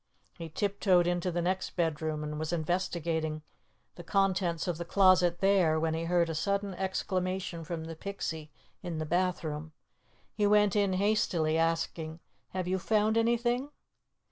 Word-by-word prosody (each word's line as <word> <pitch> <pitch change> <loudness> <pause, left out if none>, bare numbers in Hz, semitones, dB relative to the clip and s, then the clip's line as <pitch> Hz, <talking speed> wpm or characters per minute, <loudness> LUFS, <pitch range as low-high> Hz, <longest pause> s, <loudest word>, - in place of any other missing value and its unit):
He 165 -1 -6
tiptoed 190 0 +2
into 175 +1 0
the 175 0 -1
next 185 +2 -2
bedroom 155 -2 -1
and 150 0 -4
was 155 +1 -3
investigating 160 -2 -1 0.5
the 175 - -10
contents 185 -1 +1
of 175 -2 -2
the - - -2
closet 180 -1 +4
there, 185 -5 +4
when 160 0 0
he 165 +1 -2
heard 170 0 +2
a 165 - -3
sudden 200 +4 -1
exclamation 185 -2 -2
from 165 0 -5
the 165 0 -7
Pixie 160 -4 -5 0.3
in 175 -3 -4
the 155 - -2
bathroom. 160 -3 -1 0.6
He 205 -1 +1
went 210 -1 +4
in 200 -2 +2
hastily, 185 -5 +1
asking, 165 0 -1 0.3
"Have 185 -1 -3
you 190 +1 0
found 215 +2 +2
anything?" 240 +3 +1
175 Hz, 150 wpm, -30 LUFS, 160-195 Hz, 0.6 s, closet